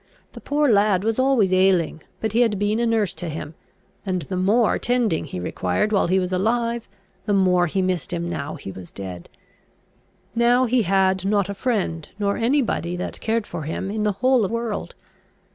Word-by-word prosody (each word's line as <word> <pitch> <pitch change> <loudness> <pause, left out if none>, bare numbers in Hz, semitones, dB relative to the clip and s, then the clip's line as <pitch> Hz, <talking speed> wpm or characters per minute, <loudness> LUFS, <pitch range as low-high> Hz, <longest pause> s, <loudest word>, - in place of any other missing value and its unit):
The - - -11
poor 295 +1 +1
lad 200 -4 +3
was 225 +2 0
always 255 -8 +3
ailing, 185 -4 +2 0.2
but 220 - -1
he 235 - +3
had 225 -4 +2
been 205 +3 0
a 235 - +1
nurse 220 -5 +1
to 175 - -5
him; 155 0 -6 0.5
and 185 -4 -2
the 185 - -5
more 205 +5 +2
tending 240 -10 0
he 130 - -6
required 90 - -1
while 200 -4 +2
he 185 +2 +2
was 185 0 -1
alive, 230 +4 0 0.4
the 205 - +2
more 180 -2 +3
he 190 +4 0
missed 185 -3 -1
him 170 -1 -2
now 145 -4 -4
he 95 - -8
was 95 -2 -11
dead. 90 -3 -8 1.0
Now 240 +2 +3
he 250 0 +2
had 190 -1 +2
not 200 -1 +1
a - - -2
friend, 195 - -2
nor 200 -1 0
any 265 +5 +2
body 175 -6 -2
that 180 - -5
cared 225 -1 0
for 165 - -6
him, 160 +6 -4
in 215 0 -2
the 210 -1 +1
whole 255 -5 +4
world. 230 0 -4
200 Hz, 195 wpm, -23 LUFS, 180-230 Hz, 1.0 s, whole